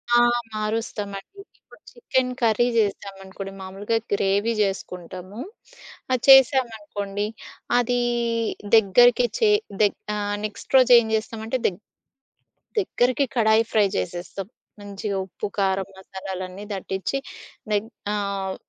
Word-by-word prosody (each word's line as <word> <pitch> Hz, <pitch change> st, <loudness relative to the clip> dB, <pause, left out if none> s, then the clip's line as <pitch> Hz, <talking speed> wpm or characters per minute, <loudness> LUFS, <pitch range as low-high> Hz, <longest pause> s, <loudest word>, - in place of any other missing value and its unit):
ఆహ్, 240 Hz, 0 st, +5 dB, 0.2 s
మారుస్తామండి. 215 Hz, -, -4 dB, 0.2 s
ఇప్పుడు -, -, -20 dB
chicken 260 Hz, -, 0 dB
curry 230 Hz, +1 st, +3 dB
జేశామనుకోండి. 195 Hz, -2 st, -2 dB
మామూలుగా 195 Hz, +4 st, -2 dB, 0.2 s
గ్రేవీ 200 Hz, +3 st, +1 dB
జేసుకుంటాము. 185 Hz, 0 st, -4 dB, 0.7 s
అది 255 Hz, -2 st, +1 dB
చేశామనుకోండి. 220 Hz, -7 st, +4 dB, 0.5 s
అదీ 245 Hz, 0 st, +1 dB, 0.8 s
దెగ్గరికి 240 Hz, +4 st, +5 dB
చే 445 Hz, -, +4 dB, 0.3 s
దెగ్ 205 Hz, -1 st, +2 dB, 0.2 s
ఆహ్, 205 Hz, 0 st, -2 dB
నెక్స్ట్ 215 Hz, +5 st, -4 dB
రోజేం 245 Hz, -3 st, +6 dB
జేస్తామంటే 220 Hz, +3 st, -3 dB
దెగ్ 185 Hz, +1 st, -5 dB, 1.0 s
దెగ్గరకి 255 Hz, -, +1 dB
కడాయి 220 Hz, -1 st, +4 dB
ఫ్రై 210 Hz, -2 st, +4 dB
జేసేస్తాం. 175 Hz, -, -4 dB, 0.3 s
మంచిగా 200 Hz, 0 st, -4 dB
ఉప్పు, 190 Hz, -, -6 dB
కారం 195 Hz, -1 st, +1 dB
మసాలాలన్నీ 190 Hz, 0 st, -7 dB
దట్టించి 190 Hz, +6 st, -3 dB, 0.5 s
దెగ్ 210 Hz, +2 st, 0 dB, 0.2 s
ఆహ్, 200 Hz, -2 st, -2 dB
205 Hz, 100 wpm, -24 LUFS, 195-235 Hz, 1.0 s, రోజేం